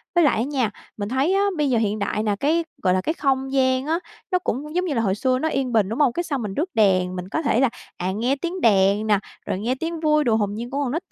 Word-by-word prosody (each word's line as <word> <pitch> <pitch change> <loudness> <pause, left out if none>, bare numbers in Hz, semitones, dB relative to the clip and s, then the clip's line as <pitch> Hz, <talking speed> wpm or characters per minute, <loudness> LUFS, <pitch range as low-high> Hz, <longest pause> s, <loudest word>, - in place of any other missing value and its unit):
Với 345 - +5
lại 280 - +3
á 225 - +1
nha, 260 -5 -1 0.3
mình 205 0 -3
thấy 270 +8 +1
á 395 - +3
bây 295 -2 +1
giờ 245 - +2
hiện 215 -1 0
đại 210 +1 -1
nè, 205 -2 +1
cái, 325 +4 +2 0.2
gọi 185 - +3
là, 185 - +1
cái 315 - -1
không 270 -4 0
gian 260 0 +2
á 325 +3 0 0.3
nó 365 - +3
cũng 300 -1 -4
giống 360 +1 +1
như 315 - -1
là 230 - +1
hồi 195 -4 +1
xưa 255 +4 +1
nó 315 +3 0
yên 265 -3 -1
bình, 210 -4 +3
đúng 225 +7 -3
hông? 275 -5 +4
Cái 345 - -1
xong 280 -6 -2
mình 210 -3 -4
rước 330 - -1
đèn, 185 -4 +3
mình 180 0 -6
có 315 - -1
thể 275 -6 +1
là, 265 -3 +4 0.3
à, 180 +1 -2
nghe 240 +7 0
tiếng 345 +5 -4
đèn 200 0 +3
nè, 205 -2 +4 0.3
rồi 185 - -2
nghe 240 +5 -1
tiếng 325 +3 -4
vui 305 -1 +3
đùa 230 -4 +2
hồn 205 -2 0
nhiên 235 +3 -5
của 275 - -4
con 250 - -2
nít 325 +6 -2
t - - -48
255 Hz, 300 wpm, -23 LUFS, 210-300 Hz, 0.3 s, Với